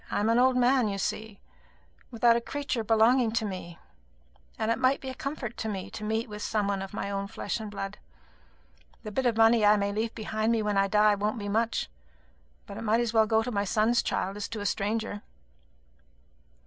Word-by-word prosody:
I - - -1
am 210 +2 +1
an 230 +1 +4
old 255 0 +4
man, 250 -1 +3
you 200 -1 -2
see, 210 +1 -4 0.7
without 235 -1 +3
a 235 - 0
creature 280 -2 -3
belonging 225 +2 +4
to 225 -1 0
me; 185 -4 -6 0.8
and 220 +1 0
it 230 - 0
might 260 +1 +3
be 265 - -6
a - - -5
comfort 265 -4 -5
to 220 - -3
me 195 -3 -5
to - - -7
meet 220 +2 -1
with 210 -1 -8
some 210 -1 -1
one 200 -1 -1
of 195 - -6
my 200 -1 -4
own 200 0 -3
flesh 205 - -4
and 215 -1 -6
blood. 195 -1 -6 1.0
The 215 - -6
bit 255 +4 0
of 230 -2 0
money 225 0 +5
I 210 0 +6
may 200 0 0
leave 220 +2 -2
behind 220 0 -1
me 225 -2 0
when 210 -1 0
I 195 0 +3
die 210 +1 +4
won't 210 +3 -1
be 205 -2 -4
much; 225 +2 0 0.8
but - - -9
it - - -6
might 225 +1 +2
as 235 -2 -1
well 220 -1 +4
go 220 0 +2
to 250 - -4
my 200 -3 0
son's 220 +3 +2
child 195 +2 -2
as 205 - -4
to 225 - -6
a 205 - -5
stranger." 205 +1 -2
220 Hz, 220 wpm, -28 LUFS, 205-230 Hz, 1.0 s, I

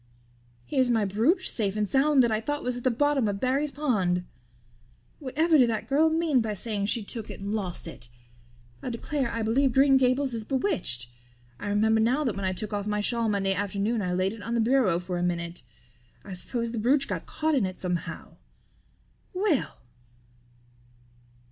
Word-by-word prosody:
Here's 255 - +1
my 225 -3 +2
brooch 240 - +1
safe 205 -3 -1
and 210 -1 0
sound 275 +3 +4
that 235 - +2
I 215 0 0
thought 290 +5 -3
was 250 0 -1
at 245 - -5
the 255 - +3
bottom 275 0 +1
of 200 -1 -2
Barry's 270 +5 +1
pond. 195 -12 0 0.9
Whatever 315 +3 +2
did 245 -2 +5
that 220 -2 -2
girl 305 +4 +3
mean 315 -5 +2
by 215 -2 -2
saying 205 -1 -1
she 225 +1 0
took 220 +1 -5
it - - -8
and 200 +2 -4
lost 190 -5 -3
it? 120 -7 -8 0.7
I - - -4
declare 260 +2 -2
I 230 -1 -2
believe 255 +4 +2
Green 270 +1 +5
Gables 260 +1 +2
is 225 -1 -3
bewitched. 260 - 0 0.5
I 205 - -5
remember 220 +2 +2
now 250 +7 +2
that 240 -8 -1
when 200 -1 -3
I 185 - +1
took 210 +3 -4
off 205 0 -2
my 210 0 0
shawl 230 +2 0
Monday 195 -2 +1
afternoon 205 +3 -1
I 180 -2 -2
laid 185 +2 0
it 225 - -10
on 230 +2 -3
the - - +1
bureau 225 -6 +3
for 180 0 -4
a - - -2
minute. 170 -1 -2 0.6
I 195 - -7
suppose 230 +5 -2
the 230 - -3
brooch 270 +5 +2
got - - -4
caught 315 0 -1
in 245 -9 +2
it 185 - -7
somehow. 180 -2 -5 1.0
Well!" 370 - 0
230 Hz, 190 wpm, -27 LUFS, 200-270 Hz, 1.0 s, did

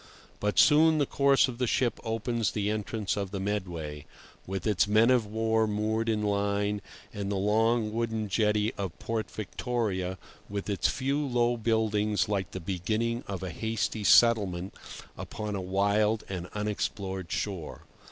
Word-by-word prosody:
But 105 0 -1
soon 155 +1 +6
the 145 - +2
course 140 0 +4
of 125 -1 -7
the 125 - +1
ship 120 +1 +1
opens 115 -1 -1
the 105 -1 0
entrance 110 -1 -2
of 100 -2 -3
the 100 0 -4
Medway, 85 -7 -4 0.4
with 95 -1 -4
its 105 -2 +2
men 110 +4 +5
of 120 -4 +3
war 110 +1 +1
moored 110 +2 0
in 110 -1 0
line, 100 0 0 0.3
and 100 -1 -3
the - - 0
long 110 +3 +2
wooden 110 -2 -1
jetty 105 +1 +1
of 95 -4 -4
Port 115 -1 -3
Victoria, 105 -4 -2 0.3
with 100 +1 -3
its 100 - +1
few 140 +2 0
low 120 -3 +1
buildings 110 -2 +1
like 100 -2 -1
the 95 - -6
beginning 110 +7 -1
of 95 -2 -4
a 95 - -4
hasty 110 +3 -2
settlement 100 -6 +4 0.5
upon 105 -1 -5
a 100 - -2
wild 100 +3 +1
and 90 -2 -5
unexplored 100 -3 -3
shore. 95 -7 -4
105 Hz, 155 wpm, -29 LUFS, 100-115 Hz, 0.5 s, soon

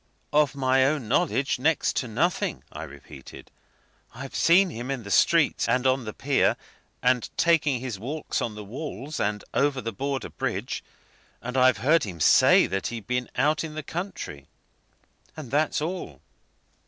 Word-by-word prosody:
"Of 145 -1 +3
my 130 -1 +3
own 135 -3 0
knowledge, 140 0 +1
next 155 +4 +1
to 125 - -1
nothing," 160 +11 -1
I - - -7
repeated. 70 -1 -13 0.6
"I've 135 +2 -8
seen 180 +2 +4
him 120 0 -6
in 135 -4 -3
the 100 - -8
streets, 165 -3 +3
and 125 +2 +1
on 130 -1 +2
the 110 - -4
pier, 140 -1 +1 0.5
and 125 -1 +2
taking 155 -6 +3
his 120 -5 -5
walks 145 +8 -3
on 110 - -3
the 105 - -7
walls 135 - -6
and 105 0 -1
over 140 -1 +1
the 115 -2 -4
Border 135 +5 -3
Bridge; - - -3 0.6
and 125 +2 -6
I've 130 -2 +5
heard 160 +1 +4
him 90 -7 -6
say 75 - +6
that 95 +1 -2
he'd 115 -4 -6
been 125 +1 -2
out 150 +5 +2
in 155 -1 -7
the 155 - -5
country. 160 - -6 0.9
And 145 -7 -8
that's 150 +1 +1
all." 160 - -5
130 Hz, 165 wpm, -26 LUFS, 115-150 Hz, 0.9 s, say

